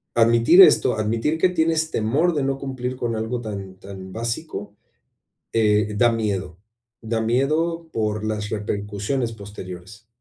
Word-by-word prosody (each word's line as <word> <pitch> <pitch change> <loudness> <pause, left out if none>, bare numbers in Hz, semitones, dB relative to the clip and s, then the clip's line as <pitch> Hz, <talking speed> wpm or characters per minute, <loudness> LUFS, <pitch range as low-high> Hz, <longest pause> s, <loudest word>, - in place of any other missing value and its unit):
admitir 115 +9 +6
esto, 130 -9 +6
admitir 115 +8 0
que 180 +3 +3
tienes 160 -2 0
temor 145 +11 +1
de 145 -3 -1
no 135 0 -1
cumplir 130 -2 -4
con 120 -2 -2
algo 110 +2 -3
tan 100 -4 -7
tan 95 -1 -10
básico, 115 -2 -4 0.8
eh, 105 -2 +2
da 120 +2 +5
miedo, 100 -6 -2 0.4
da 115 0 -2
miedo 155 +8 0
por 110 -1 -2
las 105 -1 -3
repercusiones 105 +4 -3
posteriores. 100 0 -10
115 Hz, 135 wpm, -22 LUFS, 105-135 Hz, 0.8 s, admitir